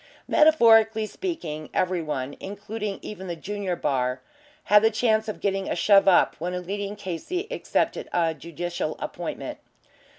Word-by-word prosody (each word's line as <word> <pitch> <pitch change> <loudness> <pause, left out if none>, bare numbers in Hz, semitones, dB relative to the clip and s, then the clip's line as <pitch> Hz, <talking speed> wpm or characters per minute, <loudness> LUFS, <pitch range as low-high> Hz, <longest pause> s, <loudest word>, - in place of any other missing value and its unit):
Metaphorically 225 -8 +5
speaking, 170 - -5
every 180 -1 +1
one 145 -3 -4
including 205 +1 -5
even 190 -3 -7
the 170 - -3
junior 195 +1 -3
bar 130 -4 -1 0.4
had 210 0 +6
the 225 - +5
chance 220 -1 +1
of 215 - -5
getting 195 -1 -1
a - - 0
shove 195 +2 +5
up 185 - +5
when 180 +3 -3
a - - -2
leading 200 +3 -4
K.C. 205 - -4
accepted - - -1
a 165 -2 +1
judicial 170 +1 -4
appointment. - - -5
195 Hz, 145 wpm, -25 LUFS, 170-215 Hz, 0.4 s, had